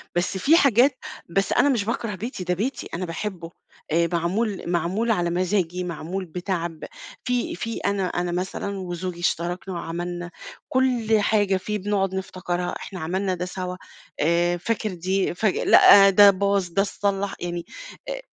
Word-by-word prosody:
بس 180 +2 0
في 310 - +5
حاجات 255 -1 +4 0.3
بس 195 +3 0
أنا 285 - +4
مش 235 -7 +1
باكره 230 -2 -2
بيتي، 210 -1 -5
ده 180 0 0
بيتي، 235 +9 -3
أنا 180 +2 -2
باحبه، 170 0 -5 0.4
آآ 170 +1 +2
معمول 190 +5 -1
معمول 185 +7 0
على 175 -4 +1
مزاجي، 180 0 0
معمول 180 +2 -4
بتعب، 170 -1 -4 0.4
في 250 -1 -1
في 230 -1 -4
أنا 200 -1 -1
أنا 175 0 -2
مثلًا 190 +2 -3
وزوجي 180 -1 -5
اشتركنا 175 +2 -2
وعملنا 175 +1 -5 0.4
كل 245 -4 +2
حاجة 205 -2 +2
فيه، 210 +3 -3
بنقعد 195 -1 -1
نفتكرها، 180 -2 -3
إحنا 185 - -8
عملنا 185 +3 -1
ده 180 0 -3
سوا، 180 0 -5 0.4
آآ 170 +3 +2
فاكر 215 +2 -2
دي؟ 185 +2 -1
فاك 210 +1 +1
لأ، 195 -1 +7
ده 200 +1 +8
باظ، 200 0 0
ده 195 +4 +1
اتصلَّح 200 0 -1
يعني، 175 -1 -4 0.4
آآ - - -4
185 Hz, 155 wpm, -24 LUFS, 175-205 Hz, 0.4 s, ده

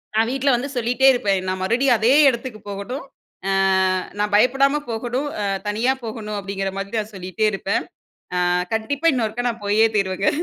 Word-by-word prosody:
நான் 225 +1 +3
வீட்ல 270 +1 0
வந்து 255 +4 -3
சொல்லிட்டே 245 +3 +2
இருப்பேன். 200 -6 +1
நான் 185 0 -2
மறுபடியும் 240 +5 +2
அதே 230 +4 +3 0.2
இடத்துக்கு 235 -3 -5
போகணும். 200 +8 -5 0.4
அ - - +1 0.7
நான் 210 0 0
பயப்படாம 270 +6 +3
போகணும் 240 +5 -2
அ - - -1 0.2
தனியா 225 +5 +1
போகணும். 215 -2 -5
அப்படிங்கிற 195 -1 -3
மாரி 200 +3 -5
நான் 215 0 -6
சொல்லிட்டே 185 +3 -2
இருப்பேன். 195 0 -1 0.7
அ - - +1 0.2
கண்டிப்பா 275 +8 -2
இன்னொருக்கா 235 -1 -2
நான் 230 -2 -8
போயே 215 +2 +4
தீருவேங்க. 195 -1 0
220 Hz, 160 wpm, -21 LUFS, 200-250 Hz, 0.7 s, போயே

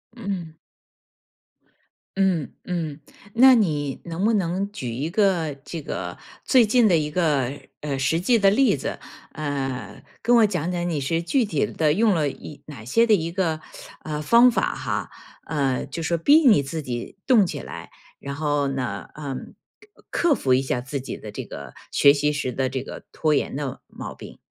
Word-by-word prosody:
嗯。 185 -8 -5 1.6
嗯 185 -6 +1
嗯， 160 -4 -3 0.4
那 260 +2 +8
你 150 - 0
能 170 +3 -2
不 225 - +3
能 195 0 -1
举 130 - -5
一 135 +7 -3
个， 175 -5 +1
这 165 -1 -6
个， 90 -8 -5 0.3
最 250 -4 +5
近 230 +1 +4
的 175 - +4
一 150 -1 -2
个， 150 -7 +1 0.3
呃， 140 -3 -3
实 145 +5 +1
际 230 +6 +3
的 195 -1 +5
例 230 - +4
子。 135 - -4 0.4
呃， 135 -7 -4 0.2
跟 240 +1 +4
我 220 - +6
讲 180 -3 -2
讲 175 0 -2
你 155 -4 -1
是 165 +5 -1
具 225 +8 +1
体 160 -8 0
地 155 -2 +1
用 210 0 +3
了 150 -3 +1
一 145 +1 -8
哪 135 -7 -10
些 230 - +3
的 225 - +4
一 170 -4 +1
个， 165 -4 -1 0.4
呃， 150 -1 -3
方 235 +11 +6
法 240 - 0
哈， - - -3 0.3
呃， 140 -4 -1
就 170 - -6
说 170 +1 0
逼 285 - +6
你 210 - +6
自 155 +3 -4
己 125 +6 -6
动 230 -6 +6
起 - - -4
来， - - -9 0.3
然 140 0 -6
后 145 -1 0
呢， 130 -3 -4
嗯， 140 -3 -6 0.6
克 345 - +1
克 - - +5
服 130 - +2
一 130 - +2
下 125 -2 -1
自 135 +2 -4
己 130 -1 -6
的 - - -9
这 - - -6
个 70 -2 -9 0.2
学 140 - +6
习 150 +1 +1
时 145 -3 -2
的 130 +1 -1
这 130 0 -3
个 - - -9
拖 155 -1 +1
延 135 - -1
的 140 -3 -4
毛 - - -8
病。 - - -11
155 Hz, 200 characters per minute, -24 LUFS, 140-195 Hz, 1.6 s, 那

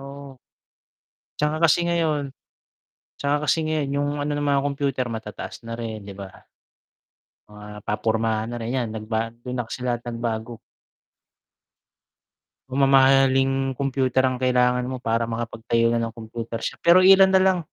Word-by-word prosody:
oo. 140 -1 -11 1.0
'Tsaka 150 +1 0
kasi 170 +2 +3
ngayon 155 -4 0 0.9
'tsaka 145 +1 -1
kasi 160 +4 +2
ngayon 155 -3 -1
'yung 145 0 0
ano 145 +1 -2
ng 145 - -2
mga 140 -1 +2
kompyuter 140 -3 -1
matataas 110 0 -7
na 115 0 -6
rin, 110 -3 -5
'di 100 - -9
ba? 95 -1 -10 1.1
Mga 105 0 -11
papormahan 110 +1 0
na - - -4
rin, 115 +3 -3
'yan 120 -3 -1
nagba 110 +1 -3
dun 125 +2 -7
na 120 - -2
kasi 125 - -7
lahat 120 -1 -2
nagbago. 115 -1 -4 2.1
Mamahaling 135 0 +3
kompyuter 130 -1 +1
ang 130 -1 -1
kailangan 125 -1 +2
mo 130 0 -5
para 115 -1 0
makapag-tayo 115 0 -1
na - - +1
nang 115 0 -3
kompyuter 115 0 -6
shop, - - -4
pero 175 +2 +7
iilan 190 +1 +7
na 190 - +5
lang. 190 -1 +3
125 Hz, 145 wpm, -23 LUFS, 115-140 Hz, 2.1 s, pero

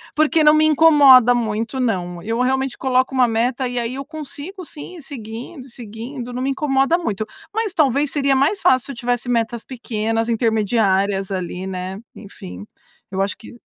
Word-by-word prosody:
Porque 310 +1 +3
não 300 0 +7
me 310 0 +4
incomoda 285 -6 +7
muito, 225 +1 -2
não. 180 -8 -2
Eu 225 +4 -3
realmente 265 +1 0
coloco 260 0 +1
uma 250 -2 +4
meta 245 +3 0
e 245 0 -3
aí 235 +2 -3
eu 275 +1 -6
consigo 315 +5 -8
sim, 330 +2 -9
seguindo, 250 +1 -8
seguindo, 240 +1 -8
não 250 +1 -4
me 275 - 0
incomoda 275 +3 +1
muito, 215 - -3 0.3
mas 435 -2 -2
talvez 290 -4 +2
seria 275 -2 +1
mais 285 +10 +1
fácil 255 -1 +3
se - - -6
eu - - -8
tivesse 245 +1 -2
metas 230 -1 -1
pequenas 225 -2 -2
intermediárias 205 -4 +1
ali, 185 0 -4
né? 185 0 -5 0.2
Enfim, 95 - -10 0.4
eu 190 - -5
acho 195 +1 0
que 235 +2 -14
245 Hz, 170 wpm, -20 LUFS, 220-275 Hz, 0.4 s, não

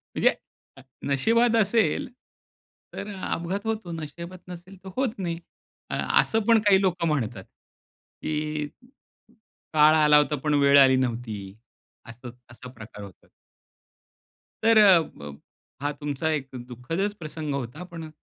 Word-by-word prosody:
म्हणजे - - +3 0.4
अ, 135 - -12 0.3
नशीबात 230 - +3
असेल 230 +6 +1 0.8
तर 200 - -6
अपघात 190 +2 -3
होतो, 220 -6 -3
नशीबात 170 +3 -7
नसेल 180 +2 -10
तर 190 - -8
होत 260 -4 0
नाही. 170 -2 -3 0.5
अ - - -3 0.3
असं 225 - 0
पण 230 -1 +6
काही 200 -2 +4
लोकं 175 -3 0
म्हणतात, 115 -10 -2 0.8
की 150 -1 -2 1.1
"काळ 155 +1 +6
आला 150 -1 +6
होता, 150 0 +2
पण 150 - +1
वेळ 140 0 +6
आली 130 -1 +6
नव्हती." 120 -4 -2 0.7
असं 120 +2 -10 0.2
असा 125 +2 -11
प्रकार 110 -3 -11
होता. 95 -4 -14 1.4
तरं 220 -1 +6 0.2
अ, - - 0
ब 70 0 -10 0.4
हा 145 +1 -1
तुमचा 145 +1 -3
एक 140 -3 -2 0.2
दुःखदच 165 - -3
प्रसंग 155 -1 -4
होता. 140 +6 -5
पण 170 -3 -9
अ, - - -10
155 Hz, 135 wpm, -25 LUFS, 135-190 Hz, 1.4 s, पण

